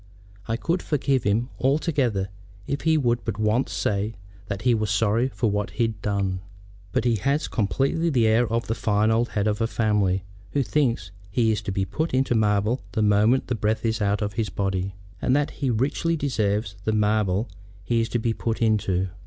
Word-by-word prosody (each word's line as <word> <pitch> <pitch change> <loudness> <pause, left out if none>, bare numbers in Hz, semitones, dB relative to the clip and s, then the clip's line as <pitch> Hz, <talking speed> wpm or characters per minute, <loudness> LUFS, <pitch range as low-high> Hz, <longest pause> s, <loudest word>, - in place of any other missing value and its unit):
I 115 - 0
could 170 +8 -1
forgive 135 -4 0
him 110 +5 +1
altogether 130 - +1 0.4
if 140 +4 -2
he 160 -1 +3
would 120 -4 +1
but - - -3
once 110 +4 +1
say 105 +2 -1 0.3
that 100 -2 -4
he 125 -1 +4
was 110 -2 0
sorry 110 +4 +2
for 115 -2 -1
what 105 0 -1
he'd 115 -3 0
done. 100 -3 -1 0.5
But - - 0
he 120 -2 +3
has 140 - 0
completely 135 - 0
the 125 -7 +3
air 110 +1 +3
of 115 0 0
the 115 - -1
fine 110 -1 +1
old 115 +2 +2
head 100 -1 -1
of 105 +1 0
a 115 - +2
family 105 -4 +1 0.3
who 140 - +2
thinks 120 - 0 0.2
he 110 +2 +2
is 105 -1 -1
to 100 - -4
be 95 0 0
put 160 - -2
into 130 -1 +2
marble 105 +2 +2
the 110 - +1
moment 105 +5 +3
the 125 - -2
breath 110 +1 -1
is 110 0 0
out 100 +1 +1
of 105 0 -3
his 110 +1 -1
body, 95 -1 -2 0.3
and 130 - +2
that 145 0 +1
he 140 -3 -2
richly 140 +8 0
deserves 105 -7 -1
the 110 - 0
marble 105 0 +1 0.4
he 115 +5 +1
is 115 - -2
to - - 0
be 115 0 0
put 115 0 -2
into." 100 -5 +1
110 Hz, 200 wpm, -24 LUFS, 105-125 Hz, 0.5 s, he